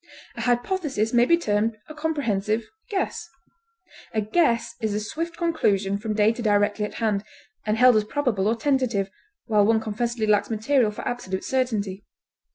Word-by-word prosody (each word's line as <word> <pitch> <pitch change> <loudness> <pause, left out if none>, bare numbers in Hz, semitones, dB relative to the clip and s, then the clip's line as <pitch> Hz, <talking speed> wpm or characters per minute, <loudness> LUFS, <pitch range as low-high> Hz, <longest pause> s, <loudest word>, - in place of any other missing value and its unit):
A - - -5
hypothesis 245 - 0
may 240 0 +5
be 335 +5 +4
termed 215 -6 0
a 310 - -9
comprehensive 230 -9 -1 0.2
guess. 395 -2 -2 0.9
A - - +3
guess 235 -1 +1
is 215 -2 -1
a - - 0
swift 330 +10 -4
conclusion 200 - +1
from 215 0 -3
data 220 +3 +2
directly 205 -1 +2
at - - -8
hand, 210 -3 0 0.4
and 215 +1 +1
held 250 0 +6
as 215 - +3
probable 215 -5 0
or 225 - +2
tentative, 240 -8 0 0.3
while 215 -3 +3
one 220 +2 +3
confessedly 225 +1 -2
lacks 210 -1 +2
material 230 +2 +2
for 210 - -6
absolute 190 -6 -3
certainty. 210 -7 -1
225 Hz, 160 wpm, -24 LUFS, 210-255 Hz, 0.9 s, held